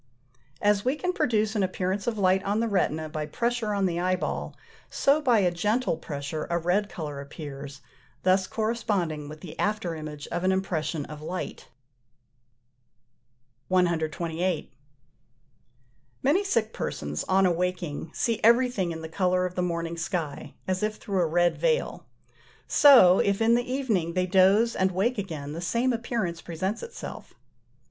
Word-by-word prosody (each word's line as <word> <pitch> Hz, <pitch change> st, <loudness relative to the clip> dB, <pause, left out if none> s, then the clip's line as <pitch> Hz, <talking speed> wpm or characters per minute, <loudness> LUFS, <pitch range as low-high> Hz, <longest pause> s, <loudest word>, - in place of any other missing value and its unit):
As 205 Hz, -1 st, +3 dB
we 255 Hz, +3 st, +1 dB
can 360 Hz, +4 st, -2 dB
produce 220 Hz, -, +1 dB
an 210 Hz, -, +1 dB
appearance 190 Hz, +2 st, -1 dB
of 230 Hz, -2 st, 0 dB
light 190 Hz, -1 st, +3 dB
on 205 Hz, +2 st, 0 dB
the 230 Hz, -, +1 dB
retina 160 Hz, -6 st, 0 dB
by 155 Hz, -1 st, -4 dB
pressure 235 Hz, +4 st, -1 dB
on 200 Hz, -1 st, +1 dB
the 175 Hz, -2 st, 0 dB
eyeball, 185 Hz, +1 st, -1 dB, 0.3 s
so 285 Hz, +3 st, +2 dB
by 250 Hz, -6 st, +4 dB
a 180 Hz, -2 st, +2 dB
gentle 210 Hz, +5 st, 0 dB
pressure 145 Hz, 0 st, -5 dB
a 170 Hz, -, +1 dB
red 180 Hz, +5 st, +1 dB
colour 150 Hz, -4 st, -6 dB
appears, 140 Hz, -1 st, -8 dB, 0.4 s
thus 185 Hz, 0 st, +3 dB
corresponding 200 Hz, -9 st, -1 dB
with 155 Hz, 0 st, -10 dB
the 170 Hz, -, -10 dB
after 205 Hz, -5 st, 0 dB
image 155 Hz, -2 st, -7 dB
of 175 Hz, -, -3 dB
an 185 Hz, -, +3 dB
impression 170 Hz, -5 st, -1 dB
of 150 Hz, -1 st, -9 dB
light. 180 Hz, +4 st, -5 dB, 2.0 s
128. 170 Hz, -1 st, 0 dB, 1.5 s
Many 325 Hz, +9 st, +3 dB
sick 230 Hz, -, 0 dB
persons, 75 Hz, 0 st, -3 dB
on 190 Hz, 0 st, +3 dB
awaking, 175 Hz, -3 st, -1 dB
see 230 Hz, +4 st, -1 dB
everything 235 Hz, -5 st, +3 dB
in 160 Hz, 0 st, -6 dB
the -, -, -4 dB
colour 180 Hz, +2 st, +1 dB
of 180 Hz, -, -4 dB
the 180 Hz, -, -1 dB
morning 170 Hz, -1 st, -2 dB
sky, 165 Hz, -3 st, -4 dB
as 185 Hz, 0 st, -1 dB
if 215 Hz, 0 st, -1 dB
through 195 Hz, -3 st, -2 dB
a 170 Hz, -, +2 dB
red 175 Hz, +2 st, +2 dB
veil: -, -, 0 dB, 0.6 s
so, 245 Hz, -11 st, +7 dB
if 200 Hz, -1 st, +2 dB
in 225 Hz, +1 st, +4 dB
the 245 Hz, +1 st, +1 dB
evening 215 Hz, -11 st, 0 dB
they 185 Hz, +1 st, +1 dB
doze 195 Hz, +5 st, +4 dB
and 190 Hz, 0 st, +2 dB
wake 210 Hz, +6 st, 0 dB
again, 155 Hz, -7 st, -5 dB
the 165 Hz, +3 st, -5 dB
same 235 Hz, +8 st, +1 dB
appearance 225 Hz, -8 st, -2 dB
presents 185 Hz, +6 st, -3 dB
itself. 470 Hz, 0 st, -8 dB
185 Hz, 155 wpm, -27 LUFS, 165-215 Hz, 2.0 s, so